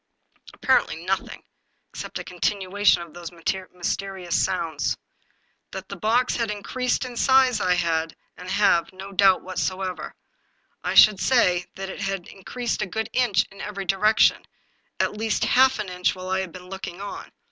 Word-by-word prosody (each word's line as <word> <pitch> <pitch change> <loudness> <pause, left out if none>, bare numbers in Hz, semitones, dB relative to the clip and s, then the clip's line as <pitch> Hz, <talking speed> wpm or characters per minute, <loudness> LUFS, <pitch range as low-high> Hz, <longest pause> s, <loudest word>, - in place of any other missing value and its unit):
" - - -38
Apparently 260 - +2
nothing, 190 +1 -2 0.5
except - - -6
a - - -5
continuation 190 +1 +1
of 170 - -14
those 175 -1 -7
mys 170 -1 -17
terious 185 0 -3
sounds. 165 -5 0 0.7
That 190 0 -8
the 200 - -5
box 230 +6 +1
had 230 -2 -1
increased 250 +5 -2
in 250 -1 -8
size 260 -2 +4
I 180 -1 +3
had, 165 -2 0 0.2
and 180 +1 -9
have, 190 -4 +3
no 190 +1 -9
doubt 195 -1 +4
whatever. 185 0 -3 0.7
I - - -2
should 210 -3 +8
say 180 -8 +2
that 195 0 -6
it - - -8
had 195 -2 -3
increased 235 +5 -4
a - - -1
good 220 +4 -4
inch 215 -6 +3
in 195 - -11
every 200 -2 -5
direction, 210 +4 +3 0.5
at 210 - 0
least 220 0 0
half 260 +1 +4
an 210 -2 -4
inch 180 +1 0
while 185 0 -7
I 190 - +1
had 190 -2 -4
been 180 +1 -11
looking 190 -1 -7
on. 200 0 -7
195 Hz, 170 wpm, -24 LUFS, 180-215 Hz, 0.7 s, should